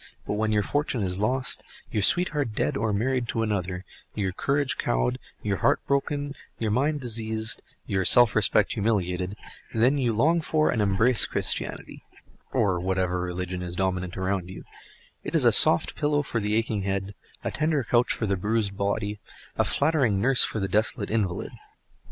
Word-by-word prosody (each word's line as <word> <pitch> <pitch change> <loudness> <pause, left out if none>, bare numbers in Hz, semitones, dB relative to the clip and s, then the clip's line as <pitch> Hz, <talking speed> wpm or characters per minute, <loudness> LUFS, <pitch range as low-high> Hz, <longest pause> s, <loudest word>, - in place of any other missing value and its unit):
But - - -2
when 110 +1 0
your 105 -1 +2
fortune 145 -5 -1
is 90 0 -2
lost, 125 +5 0 0.3
your 105 - 0
sweetheart 150 - +3
dead - - 0
or 110 +1 0
married 120 +4 0
to 115 - -1
another, 95 -3 -3 0.3
your 100 -3 -1
courage 140 +7 -1
cowed, - - 0 0.2
your - - -1
heart - - +2
broken, 145 +1 -1 0.2
your 110 -2 -1
mind 145 +6 +1
diseased, 110 -2 -2 0.2
your 95 -1 -1
self 120 +2 +6
respect 105 -1 +3
humiliated, 95 -3 -1 0.4
then 125 +6 +3
you 125 -3 +1
long 160 +10 +2
for 155 0 +1
and 115 - 0
embrace 105 +4 +2
Christianity - - -3 0.5
(or 95 -3 +1
whatever 90 0 -1
religion 90 0 -4
is 90 -1 -5
dominant 90 -1 -2
around 95 -1 -2
you): 95 - -9 0.6
it - - -4
is - - +3
a - - +7
soft - - +3
pillow 145 0 +1
for 115 - -2
the 105 0 -1
aching 110 -2 0
head, 95 +1 -3 0.3
a - - -2
tender 155 -3 0
couch 120 +2 +2
for 110 - -1
the 100 -2 0
bruised 105 +1 -1
body, 105 +1 -2 0.4
a - - +2
flattering 140 -9 +2
nurse 125 +4 +6
for 110 - -1
the 95 - -1
desolate 105 +1 0
invalid. 100 -5 -1
105 Hz, 170 wpm, -26 LUFS, 95-125 Hz, 0.6 s, a